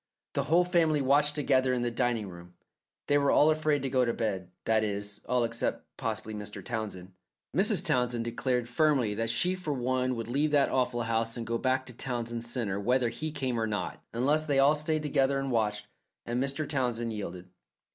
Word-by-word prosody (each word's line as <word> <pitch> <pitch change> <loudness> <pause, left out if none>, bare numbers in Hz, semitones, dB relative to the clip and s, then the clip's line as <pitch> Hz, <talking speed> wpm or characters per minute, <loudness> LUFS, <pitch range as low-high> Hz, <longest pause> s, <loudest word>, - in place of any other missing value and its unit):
The - - 0
whole 170 +3 +4
family 165 -4 +2
watched 145 +2 +3
together 130 -3 +2
in 120 - -1
the 120 - 0
dining 120 -3 0
room. 90 -1 -12 0.5
They 145 0 +3
were 140 -1 +2
all 155 +2 +5
afraid 155 -2 +1
to 135 - -1
go 130 -1 +3
to 115 -1 0
bed 95 -6 -2 0.2
that 110 -1 +3
is, 105 0 -3
all 125 -1 +2
except 115 0 -2
possibly 110 - -3
Mr. 105 0 -6
Townsend. 105 -6 -5 0.4
Mrs. - - +2
Townsend 120 -2 +1
declared 120 +1 -1
firmly 130 -4 +2
that 115 +2 -1
she 175 +11 +2
for 180 -5 -3
one 130 0 0
would 115 -1 -5
leave 140 +6 +1
that 145 -2 +3
awful 125 -2 0
house 115 +1 -1
and 115 - -4
go 115 +1 -1
back 130 0 +1
to 125 - -7
Townsend 120 -2 -3
Centre 115 -5 -2
whether 125 +3 +2
he 155 +6 -4
came 130 -5 -2
or 110 - 0
not, 105 -5 -4
unless 145 +6 +2
they 140 -2 +2
all 140 +2 +6
stayed 155 0 -1
together 140 -2 +2
and 135 -1 -2
watched, 105 -3 0 0.4
and 120 +2 -1
Mr. 140 +2 -2
Townsend 120 -5 -1
yielded. 90 -3 -7
125 Hz, 195 wpm, -29 LUFS, 115-140 Hz, 0.5 s, all